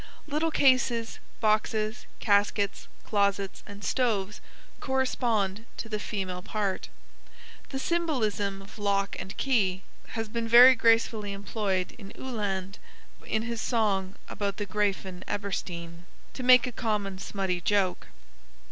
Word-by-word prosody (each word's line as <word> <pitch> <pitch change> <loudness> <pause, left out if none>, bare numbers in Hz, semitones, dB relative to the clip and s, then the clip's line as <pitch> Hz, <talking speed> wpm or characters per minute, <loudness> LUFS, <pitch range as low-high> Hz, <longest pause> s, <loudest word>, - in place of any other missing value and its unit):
Little 310 +2 0
cases, 255 -6 +2 0.2
boxes, 215 +1 +1
caskets, 205 -1 +1 0.2
closets, 200 -2 0
and 200 0 -10
stoves 210 -2 0 0.4
correspond 230 -6 0
to - - -5
the 215 -1 -3
female 185 -4 -4
part. 200 0 -2 0.8
The 270 - -4
symbolism 225 - -1
of 200 +2 -14
lock 200 -1 0
and 195 - -7
key 195 -8 +1 0.3
has 225 0 -2
been 230 +1 -3
very 245 +3 +10
gracefully 225 -3 +2
employed 195 -2 -2
by 200 -2 -10
Uhland 200 -6 -3 0.5
in 220 0 0
his 235 -1 -3
song 200 -5 0
about 200 -2 -3
the 205 - -2
"Grafen 190 -2 -1
Eberstein," 175 -4 -4 0.3
to - - -6
make 255 0 +7
a 250 - -4
common 210 -5 -2
smutty 190 -2 -2
joke. 195 -2 +1
210 Hz, 120 wpm, -28 LUFS, 195-230 Hz, 0.8 s, very